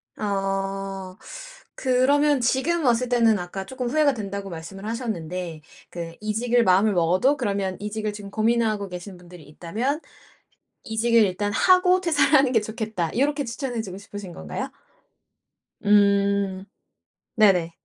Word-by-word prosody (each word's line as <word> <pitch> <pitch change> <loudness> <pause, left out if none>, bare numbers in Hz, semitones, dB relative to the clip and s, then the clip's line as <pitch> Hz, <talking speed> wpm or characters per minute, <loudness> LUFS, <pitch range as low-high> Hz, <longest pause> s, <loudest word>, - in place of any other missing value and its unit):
아. 195 -1 -3 0.6
그러면 280 +2 +2
지금 285 +8 +1
왔을 245 +1 +2
때는 230 -3 +3
아까 185 +2 -6
쪼끔 255 -2 -4
후회가 295 +1 +3
된다고 200 -2 -5
말씀을 180 +4 -8
하셨는데 180 -8 -4 0.3
그 170 -1 -6
이직을 235 +3 +1
마음을 195 +2 +4
먹어도 185 - +2
그러면 200 -5 -2
이직을 210 0 -3
지금 205 -1 -9
고민하고 220 -2 +1
계시는 180 +1 -8
분들이 175 -2 -14
있다면 215 - -3 0.8
"이직을 230 +1 +2
일단 205 +2 -1
하고 365 - +4
퇴사를 320 -4 +2
하는 270 -3 +5
게 230 - +4
좋겠다." 215 -5 -4
요렇게 285 +2 +1
추천해 240 0 -4
주고 190 -4 -8
싶으신 200 -2 -9
건가요? 80 - -5 1.1
음. 200 -2 +2 0.7
네네. 190 -6 +4
210 Hz, 305 characters per minute, -24 LUFS, 190-245 Hz, 1.1 s, 하는